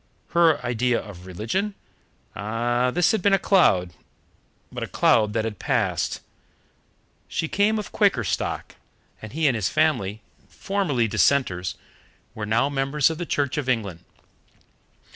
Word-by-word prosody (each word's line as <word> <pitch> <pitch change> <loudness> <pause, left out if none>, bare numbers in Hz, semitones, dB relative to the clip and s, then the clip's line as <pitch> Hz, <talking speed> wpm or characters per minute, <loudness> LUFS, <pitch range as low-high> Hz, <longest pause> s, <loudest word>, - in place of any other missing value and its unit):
Her 165 -3 +4
idea 120 0 +1
of 95 -4 -11
religion 115 - -2 0.6
ah, 120 +4 0
this 175 +5 +2
had 220 - 0
been 200 +1 +4
a - - +2
cloud, 100 - +3 0.8
but - - -6
a - - -3
cloud 105 -2 +3
that 110 -2 -2
passed. - - -1 1.1
She 160 - -2
came 205 +5 +2
of 210 - -5
Quaker 195 - +2
stock, 95 - -3 0.4
and 110 - -8
he 160 +1 -1
and 135 - +4
his 110 -4 0
family, 120 -10 0 0.3
formerly 175 - -1
Dissenters, 95 -3 +1 0.6
were 105 -1 -5
now 115 +5 +2
members 140 +1 +1
of 160 - -6
the 175 - -4
Church 145 +1 0
of 135 -3 -3
England. 100 -9 -2
125 Hz, 140 wpm, -24 LUFS, 105-160 Hz, 1.1 s, Her